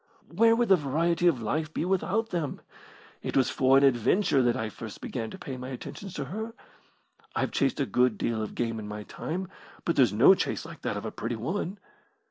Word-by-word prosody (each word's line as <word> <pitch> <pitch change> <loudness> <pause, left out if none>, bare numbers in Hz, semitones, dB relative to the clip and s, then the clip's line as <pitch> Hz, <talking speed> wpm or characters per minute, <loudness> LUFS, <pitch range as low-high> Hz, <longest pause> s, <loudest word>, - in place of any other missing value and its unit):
"Where 230 +3 +6
would 240 -1 +1
the 190 - +8
variety 165 +3 +1
of 130 -9 +2
life 155 +7 -1
be 160 - -2
without 195 +4 0
them? 165 -6 -2 0.6
It - - -2
was 130 - +3
for 135 0 +4
an 135 - +4
adventure 135 - +3
that 120 -1 +2
I 110 - -2
first 110 -1 -8
began 115 -3 -4
to - - -9
pay 130 -2 -6
my 125 +1 -6
attentions 170 +8 -7
to 145 - -3
her. 220 - -5 0.8
I've - - 0
chased - - +1
a - - +2
good 125 -4 +2
deal 115 -2 -1
of 110 - -5
game 115 -2 -1
in 105 - -6
my 105 0 -6
time, 180 - -4 0.4
but 170 - +1
there's 125 -7 +5
no 105 - +7
chase - - -2
like - - -10
that - - -2
of - - -5
a - - -3
pretty 115 +1 -3
woman. 180 - -3
135 Hz, 215 wpm, -28 LUFS, 120-180 Hz, 0.8 s, the